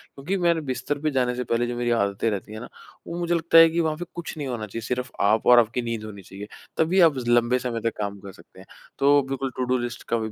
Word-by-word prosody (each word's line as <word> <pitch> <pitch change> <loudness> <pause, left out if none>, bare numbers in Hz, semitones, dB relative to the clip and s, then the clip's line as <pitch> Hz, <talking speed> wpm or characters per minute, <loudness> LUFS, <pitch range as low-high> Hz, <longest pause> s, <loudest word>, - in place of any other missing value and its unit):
क्योंकि 170 +8 -3
मैंने 170 -2 +2
बिस्तर 135 +1 -3
पे 155 0 -1
जाने 125 -2 0
से 125 - -3
पहले 120 0 0
जो 120 - -4
मेरी 120 0 -1
आदतें 100 -1 0
रहती 105 +1 -5
हैं 110 - -7
ना - - -9 0.4
वो 170 - -5
मुझे 175 0 0
लगता 165 0 +3
है 165 0 +9
कि 170 +1 -2
वहाँ 155 -2 0
पे 175 - -5
कुछ 175 -1 -6
नहीं 145 -2 -4
होना 120 -4 -4
चाहिए 115 +3 -6
सिर्फ़ 125 0 -3
आप 105 +2 +2
और 125 -1 +8
आपकी 115 +1 0
नींद 115 -2 -4
होनी 100 -2 -9
चाहिए 100 +2 -10 0.3
तभी 170 +4 +2
आप 150 - -2
लंबे 120 +1 +3
समय 120 -2 -3
तक 115 0 -2
काम 100 -1 -4
कर 100 0 -10
सकते - - -18
हैं। - - -13 0.3
तो 145 +1 +5
बिल्कुल 135 -1 -3
टूडू 130 0 0
लिस्ट 120 -1 -5
का 115 - +4
125 Hz, 260 wpm, -24 LUFS, 115-145 Hz, 0.4 s, है